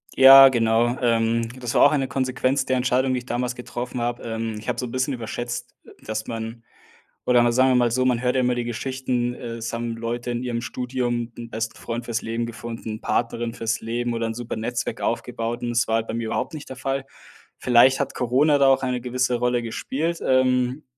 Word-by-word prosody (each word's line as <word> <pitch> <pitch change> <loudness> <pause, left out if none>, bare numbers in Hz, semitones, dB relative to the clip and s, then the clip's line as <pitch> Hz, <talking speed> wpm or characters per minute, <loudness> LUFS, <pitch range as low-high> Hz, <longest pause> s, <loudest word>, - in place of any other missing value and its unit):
Ja, 135 0 +10
genau, 120 0 +2
ähm, 115 -1 +1
das 120 -2 -4
war - - +6
auch 145 - +7
eine 135 -3 0
Konsequenz 130 0 0
der 130 -1 +1
Entscheidung, 130 +1 +1
die 125 - 0
ich 125 - -13
damals 125 +1 -1
getroffen 125 0 -5
habe. 120 0 -2
Ähm, 115 -1 -3
ich 105 - -12
habe 125 -1 -1
so 125 - -2
'n - - -9
bisschen 130 +2 -1
überschätzt, 120 +1 -5 0.3
dass 110 0 -4
man 115 0 -6 0.6
oder 125 -1 +5
mal, 120 0 +3
sagen 130 +2 +4
wir - - +3
mal 120 -1 +3
so, 130 +2 +1
man 125 -2 +2
hört 125 0 +1
ja 130 - +2
immer 125 0 +2
die 120 0 -2
Geschichten, 125 0 -2
äh, 120 -1 -7
es 115 0 -5
haben 115 0 -3
Leute 120 +1 -4
in 120 0 -2
ihrem 120 -2 -2
Studium 120 -1 -2
'n 115 -1 -8
besten 110 +1 -4
Freund 120 0 -5
fürs 115 -1 -2
Leben 115 +1 -2
gefunden, 115 -2 -7
Partnerin 115 0 -1
fürs 115 -2 -2
Leben 120 +1 -2
oder 115 0 -1
'n 115 - -3
super 120 0 -5
Netzwerk 115 +2 -3
aufgebaut 115 +1 -2
und 120 - -2
das 120 0 +1
war 110 - +2
halt 115 0 -1
bei 110 - -4
mir 115 0 -2
überhaupt 110 - -2
nicht 150 - -8
der 130 - -7
Fall. 135 +1 -2 0.5
Vielleicht 125 +2 +5
hat - - -2
Corona 135 +5 +3
da 140 - +5
auch 135 0 +4
eine 125 -1 -1
gewisse 125 0 0
Rolle 120 0 0
gespielt, 155 +8 -3
ähm, 130 +1 +2
120 Hz, 220 wpm, -23 LUFS, 115-130 Hz, 0.6 s, Ja